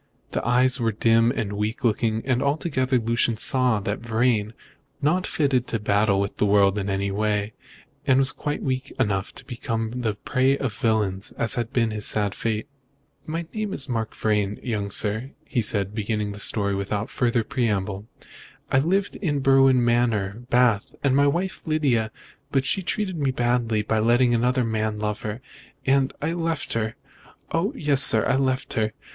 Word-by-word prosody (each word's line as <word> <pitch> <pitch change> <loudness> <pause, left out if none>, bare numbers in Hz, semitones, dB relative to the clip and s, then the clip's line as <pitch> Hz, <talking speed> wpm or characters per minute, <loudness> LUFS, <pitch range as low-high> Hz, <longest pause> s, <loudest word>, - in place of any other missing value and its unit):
The - - -2
eyes 130 +2 +2
were 115 -1 +1
dim 115 +2 +3
and 115 -5 -2
weak 105 +2 -3
looking, 110 -1 +1
and 130 -1 +1
altogether 140 -3 0
Lucian 115 0 0
saw 125 -2 +2
that 100 +2 -3
Vrain 115 -1 +1
was 110 - -13 0.5
not 175 +6 +1
fitted 135 -5 0
to 115 - -2
battle 105 -1 +2
with 100 0 -2
the - - +2
world 100 0 +4
in 100 0 -3
any 100 0 -1
way, 105 +1 -1 0.5
and 135 0 +4
quite 145 0 -3
weak 130 0 -2
enough 100 -6 0
to 135 - -7
become 115 -3 -3
the 110 -3 -1
prey 130 +3 +1
of 130 -6 -3
villains, 100 -3 -1
as 115 - 0
had 120 0 -2
been 115 -4 +1
his 105 -1 -2
sad 105 -2 0
fate. 110 +2 -3 0.6
"My 165 +2 -3
name 215 -2 -3
is 140 - -1
Mark 115 -4 -3
Vrain, 105 -2 0
young 105 -5 -2
sir," 110 +6 0 0.3
said 100 -2 +1
he, - - -16
beginning 105 -1 -2
his 100 - -4
story 100 -2 +2
without 100 +3 -3
further 120 -2 +1
preamble. 105 -4 -2 0.6
"I 135 - +4
lived 190 +7 0
in 145 -7 -1
Berwin 135 -2 +4
Manor, 115 -3 +1
Bath, 120 +1 +2
with 140 -2 +3
my 140 +1 +4
wife 180 +6 -1
Lydia, 140 -9 +1 0.4
but 135 -1 +1
she 190 - +1
treated 190 0 -2
me 140 -2 +1
badly 120 -4 0
by 110 +1 0
letting 120 +2 +3
another 125 +2 +2
man 110 -1 -1
love 105 0 -3
her, 110 +3 -5 0.4
and 135 0 +2
I 160 +2 0
left 165 -7 -2
her. 110 -1 -2 0.6
Oh, 165 +5 0
yes, 145 -3 +3
sir, 110 -4 +6
I 135 - +2
left 130 -1 -1
her. 110 -1 0
115 Hz, 175 wpm, -24 LUFS, 105-135 Hz, 0.6 s, sir